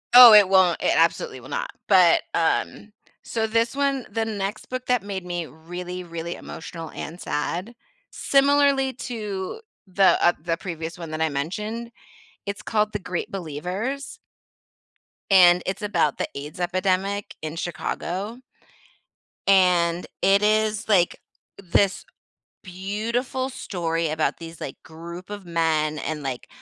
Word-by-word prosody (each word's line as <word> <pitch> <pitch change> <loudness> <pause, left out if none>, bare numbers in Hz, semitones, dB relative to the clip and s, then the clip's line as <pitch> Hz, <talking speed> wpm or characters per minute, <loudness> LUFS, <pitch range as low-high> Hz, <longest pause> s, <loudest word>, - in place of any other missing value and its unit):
Oh, 245 -2 +12
it 205 -2 +9
won't, 185 -3 +4
it - - +2
absolutely 165 -5 +1
will 125 - -13
not, - - -3 0.2
but, 185 -4 +5
um 170 +5 0 0.3
So 225 -1 -1
this 230 +2 +1
one 275 -2 0
the 225 +1 -1
next 210 -1 -4
book 255 0 -4
that 250 -5 +2
made 195 -3 -5
me 175 -1 -3
really, 175 +3 -7
really 170 0 -5
emotional 165 0 -8
and 170 +3 -7
sad, 180 +10 -3 0.4
similarly 275 -1 +3 0.2
to 210 - -5 0.3
the, 190 +1 +4
uh 175 - +6
the 165 0 -1
previous 165 -2 -6
one 165 -2 -7
that 155 0 -4
I 160 - +2
mentioned, 210 +11 -4 0.6
it's 200 0 -4
called 215 -1 0
The 210 - -2
Great 180 -3 -4
Believers 195 - -4 1.1
and 180 -2 +7
it's 190 +4 -3
about 205 -8 +1
the - - -1
AIDS 150 +6 -7
epidemic 185 +3 -1
in 155 0 -5
Chicago. 185 +5 -4 1.1
And 180 -3 +4 0.2
it 195 +2 +4
is 215 +1 +2
like, 180 -5 +3 0.4
this 195 +1 +1 0.6
beautiful 220 +8 -3
story 165 -9 -2
about 155 0 -1
these, 165 -1 -10
like, 135 - -6
group 170 +3 -10
of 205 -1 -7
men, 160 -3 0
and, 150 0 -4
like, 130 -3 -5
185 Hz, 140 wpm, -24 LUFS, 170-215 Hz, 1.1 s, Oh